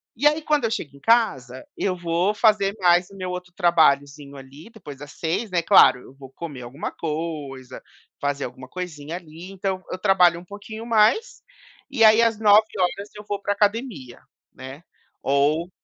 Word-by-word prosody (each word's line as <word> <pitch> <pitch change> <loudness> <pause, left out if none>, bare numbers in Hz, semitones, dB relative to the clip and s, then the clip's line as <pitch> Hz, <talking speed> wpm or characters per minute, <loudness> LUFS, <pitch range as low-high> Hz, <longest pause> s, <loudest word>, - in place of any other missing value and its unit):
E 295 - +3
aí 300 +2 +2
quando 300 -2 0
eu 225 - 0
chego 145 - -5
em - - -18
casa, 140 - +1
eu 185 -2 -1
vou 175 +3 -1
fazer 210 -2 +2
mais 175 +1 +3
o 195 - -14
meu 185 -1 -5
outro 180 0 -7
trabalhozinho 145 -5 +1
ali, 140 +7 -13
depois 170 - -11
das 145 +1 -11
18h, 180 +6 -3
né. 175 - +1
Claro, 170 -7 +6
eu - - -16
vou 135 -1 -13
comer 145 -3 -8
alguma 130 +6 -6
coisa, 150 -5 -6 0.4
fazer 140 0 -2
alguma 130 0 -10
coisinha 165 -2 -7
ali, 170 +2 -12
então 190 -1 -4
eu - - -4
trabalho 180 -3 +3
um 175 - -15
pouquinho 205 +3 -9
mais, 230 - +2 0.5
e 270 -5 +1
aí 220 +1 +7
às 225 -2 +1
21h 205 -2 +2
eu 210 - -10
vou 205 - -3
pra 205 - -1
academia, 205 - -2 0.3
né. 135 +5 -11 0.4
Ou 145 +5 +1
180 Hz, 175 wpm, -23 LUFS, 145-210 Hz, 0.5 s, aí